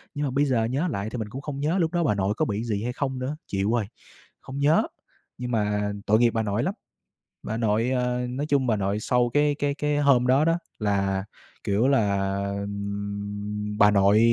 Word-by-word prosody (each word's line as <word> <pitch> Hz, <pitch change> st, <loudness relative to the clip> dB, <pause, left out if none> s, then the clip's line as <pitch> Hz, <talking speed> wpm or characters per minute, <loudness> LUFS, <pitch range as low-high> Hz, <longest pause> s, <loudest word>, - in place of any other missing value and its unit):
Nhưng 145 Hz, 0 st, -1 dB
mà 135 Hz, -, -1 dB
bây 140 Hz, +3 st, +2 dB
giờ 125 Hz, -5 st, +1 dB
nhớ 135 Hz, +10 st, 0 dB
lại 100 Hz, +2 st, -3 dB
thì -, -, -4 dB
mình 110 Hz, -2 st, -4 dB
cũng 135 Hz, +6 st, -7 dB
không 145 Hz, -2 st, -5 dB
nhớ 155 Hz, +6 st, +1 dB
lúc 165 Hz, -2 st, +1 dB
đó 175 Hz, -1 st, +1 dB
bà 115 Hz, -10 st, +2 dB
nội 100 Hz, +1 st, 0 dB
có -, -, +2 dB
bị 105 Hz, 0 st, -2 dB
gì 110 Hz, -3 st, -2 dB
hay 125 Hz, -, -2 dB
không 130 Hz, -1 st, -2 dB
nữa, 130 Hz, +4 st, -3 dB
chịu 100 Hz, +2 st, 0 dB
rồi, 115 Hz, -3 st, +1 dB, 0.6 s
không 135 Hz, +1 st, -7 dB
nhớ. 145 Hz, +3 st, +4 dB, 0.6 s
Nhưng 125 Hz, 0 st, -4 dB
mà 105 Hz, -2 st, 0 dB
tội 110 Hz, +1 st, +4 dB
nghiệp 120 Hz, 0 st, +4 dB
bà 115 Hz, -, -1 dB
nội 105 Hz, +2 st, -1 dB
lắm. 190 Hz, -, -1 dB, 0.7 s
Bà 110 Hz, -, -3 dB
nội, 115 Hz, +2 st, +1 dB
ơ, 125 Hz, -1 st, 0 dB
nói 135 Hz, +4 st, -3 dB
chung 140 Hz, -3 st, +2 dB
bà 110 Hz, -3 st, +2 dB
nội 100 Hz, +1 st, -1 dB
sau 120 Hz, +2 st, +1 dB
cái 145 Hz, 0 st, +3 dB
cái 145 Hz, -1 st, 0 dB
cái 150 Hz, 0 st, 0 dB
hôm 135 Hz, -4 st, +4 dB
đó 135 Hz, +4 st, +4 dB
đó, 165 Hz, +1 st, +2 dB, 0.2 s
là, 100 Hz, -2 st, 0 dB, 0.4 s
kiểu 105 Hz, +6 st, +2 dB
là, 100 Hz, -7 st, +2 dB, 0.3 s
ừm, 100 Hz, +1 st, -4 dB
bà 105 Hz, -1 st, +7 dB
nội 100 Hz, +1 st, +4 dB
115 Hz, 220 wpm, -25 LUFS, 105-135 Hz, 0.7 s, bà